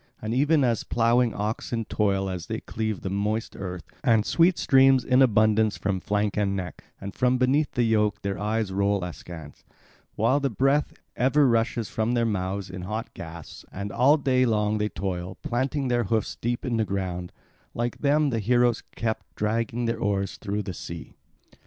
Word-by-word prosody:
And 110 +1 -3
even 145 +3 +3
as 120 -3 +1
ploughing 120 +1 +2
oxen 110 +2 -3
toil 100 -2 0
as 90 -3 -5
they - - -4
cleave 110 -2 -3
the 95 - -3
moist 105 +3 -2
earth, 90 -2 -6 0.2
and 115 -5 +3
sweat 170 +1 +3
streams 135 -2 +5
in 130 +1 +4
abundance 110 -3 +3
from 100 -2 -1
flank 105 +2 -1
and 100 -2 0
neck; 90 -3 -6 0.2
and 100 0 -7
from 125 0 +2
beneath 135 +4 +2
the 120 - +1
yoke 105 -3 +1
their 100 -2 -2
eyes 105 -1 -1
roll 100 0 +1
askance, 85 -3 -9 0.5
while 125 +6 +2
the 140 -1 0
breath 135 +5 +1 0.2
ever 135 +3 +3
rushes 115 -1 +1
from 110 +4 -1
their 120 -1 +2
mouths 100 -2 -2
in 90 0 -7
hot 110 +5 -5
gasps; 80 -1 -9
and 100 +2 -5
all 135 +7 +4
day 130 -3 +2
long 105 -3 +1
they 105 0 0
toil, 90 -1 -4
planting 130 +3 -1
their 120 -2 +1
hoofs 110 +1 -1
deep 120 +1 -3
in 120 -3 0
the 110 - +2
ground; 90 -3 -3 0.4
like 120 0 -2
them 145 0 +2
the 115 - 0
heroes 120 +2 +2
kept 110 -1 -3
dragging 115 +2 -1
their 115 0 -1
oars 100 -2 -1
through 105 0 -3
the 95 - -5
sea. 85 -1 -8
110 Hz, 180 wpm, -26 LUFS, 100-125 Hz, 0.5 s, streams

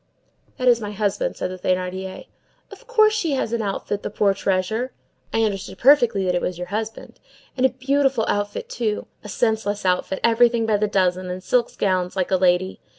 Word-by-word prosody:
"That 255 - -1
is 235 -2 +5
my 210 -1 -5
husband," 215 - -1
said - - -3
the 185 - -8
Thénardier. 185 +1 -2 0.5
"Of - - -14
course 435 -3 +4
she 345 -9 0
has 250 -4 -1
an 235 - 0
outfit, 205 0 -3
the - - -4
poor 205 -1 +2
treasure.—I 220 +4 -2
understood 200 -3 -3
perfectly 240 -7 +4
that 180 - +1
it 175 - 0
was 180 - -3
your 180 0 -6
husband.—And 220 +4 -5
a - - -6
beautiful 265 -1 +1
outfit, 205 0 -2
too! 220 -3 -2 0.2
a 210 - -9
senseless 215 -3 -1
outfit, 185 +1 0
everything 235 0 +4
by 215 -2 +2
the 210 +1 +1
dozen, 185 -2 0
and 180 +1 -5
silk 240 +1 0
gowns 185 -2 0
like 185 -1 -1
a 190 - +4
lady. 185 +1 +1
210 Hz, 185 wpm, -22 LUFS, 185-240 Hz, 0.5 s, is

